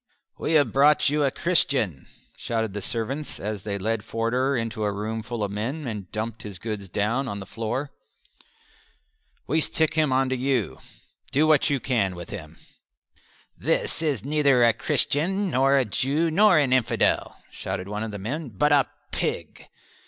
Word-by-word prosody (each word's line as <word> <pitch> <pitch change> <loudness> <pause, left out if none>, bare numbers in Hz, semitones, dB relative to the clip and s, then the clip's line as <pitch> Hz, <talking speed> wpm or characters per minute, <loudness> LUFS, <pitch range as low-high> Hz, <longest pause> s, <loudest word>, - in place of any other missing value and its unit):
"We 160 - -1
have 145 -7 +4
brought 145 +2 +5
you 150 +1 +1
a 140 - +3
Christian," 135 - +1 0.3
shouted 110 -3 -2
the 105 - -4
servants 125 +8 -3
as 105 -1 -4
they 100 -1 -3
led 110 +2 -2
Forder 125 +5 0
into 115 -1 -3
a 105 - +1
room 110 +2 -3
full 115 0 -4
of 100 - -2
men, 125 +9 -3
and 105 -6 -6
dumped 110 +1 -4
his 100 -3 -7
goods 100 0 -5
down 115 +9 0
on 100 -4 -4
the 95 - -7
floor. 115 +7 -4 1.5
"We 160 +4 +1
stick 160 +1 +1
him 155 -3 +2
on 130 +1 +2
to 130 - 0
you; 130 -3 -1 0.5
do 150 +3 +3
what 155 -1 +4
you 140 -2 +1
can 105 -8 0
with 85 0 -9
him." 80 -5 -8 1.0
"This - - -1
is 145 -7 -1
neither 140 -4 +3
a 115 -1 +5
Christian, 185 - +1
nor 135 +1 +3
a 135 - +3
Jew, 145 +9 0
nor 200 +1 +5
an 140 -4 +3
infidel," 125 -3 +1
shouted 90 - -5
one 105 +1 -4
of 110 - -3
the 105 - -6
men, 130 +9 -4
"but 135 +8 +1
a 140 -2 +4 0.2
pig." - - -3
125 Hz, 175 wpm, -25 LUFS, 105-145 Hz, 1.5 s, brought